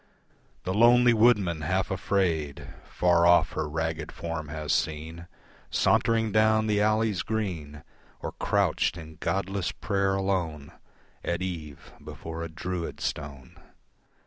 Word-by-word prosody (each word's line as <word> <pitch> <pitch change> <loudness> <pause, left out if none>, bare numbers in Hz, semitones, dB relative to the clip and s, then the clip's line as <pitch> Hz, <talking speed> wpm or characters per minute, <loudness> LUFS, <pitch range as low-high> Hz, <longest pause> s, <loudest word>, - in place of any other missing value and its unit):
The 95 - -2
lonely 120 +3 +6
woodman 105 -8 +3
half 95 +5 -1
afraid 85 -6 -1 0.2
Far 85 -1 +3
off 85 0 +5
her 75 -1 -3
ragged 80 0 -3
form 80 -2 -5
has 75 0 -2
seen 80 +2 -2 0.4
Sauntering 115 -1 +2
down 110 +1 +3
the 105 -1 +1
alleys 110 -2 +2
green, 85 -9 -4 0.4
Or - - -5
crouched - - 0
in 80 -1 -10
godless 95 0 -1
prayer 100 -2 0
alone 90 -7 -2 0.5
At 85 +2 -2
eve 80 -6 -7
before 80 0 -7
a 85 - -4
Druid 85 +2 -5
stone. 70 -3 -6
85 Hz, 120 wpm, -27 LUFS, 80-100 Hz, 0.5 s, lonely